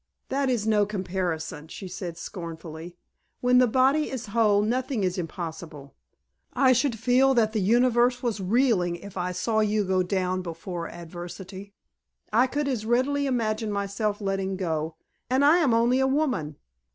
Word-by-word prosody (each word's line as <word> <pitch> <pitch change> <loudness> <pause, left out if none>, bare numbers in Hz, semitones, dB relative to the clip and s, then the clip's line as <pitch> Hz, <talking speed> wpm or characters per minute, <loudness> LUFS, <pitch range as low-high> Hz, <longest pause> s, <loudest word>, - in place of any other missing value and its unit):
"That 275 0 0
is 235 -4 0
no 215 -2 +3
comparison," 180 -6 -3
she 190 +4 -8
said 180 -2 -6
scornfully. 170 -2 -8 0.4
"When 250 0 +4
the 250 - +5
body 265 +6 +2
is 255 -3 -5
whole 210 -3 +4
nothing 245 0 -1
is 185 0 -1
impossible. 160 -4 -7 0.6
I 260 -2 +4
should 250 -1 +1
feel 260 +4 +3
that 220 -2 +2
the 215 - 0
Universe 245 +4 +3
was 225 -4 -1
reeling 195 -4 +2
if 195 +3 -11
I 180 -1 -2
saw 220 +5 0
you 215 0 +2
go 190 -1 +1
down 185 0 -1
before 170 0 -6
adversity. 180 +4 -9 0.6
I 245 +4 +5
could 285 +2 -2
as 250 -6 -1
readily 265 +5 +1
imagine 220 -4 -1
myself 200 +1 -2
letting 195 -1 -2
go, 160 -3 -2 0.3
and 260 +3 +3
I 305 +4 +6
am 310 -8 +3
only 235 +3 +3
a 265 - +3
woman." 265 - -1
210 Hz, 160 wpm, -26 LUFS, 180-250 Hz, 0.6 s, I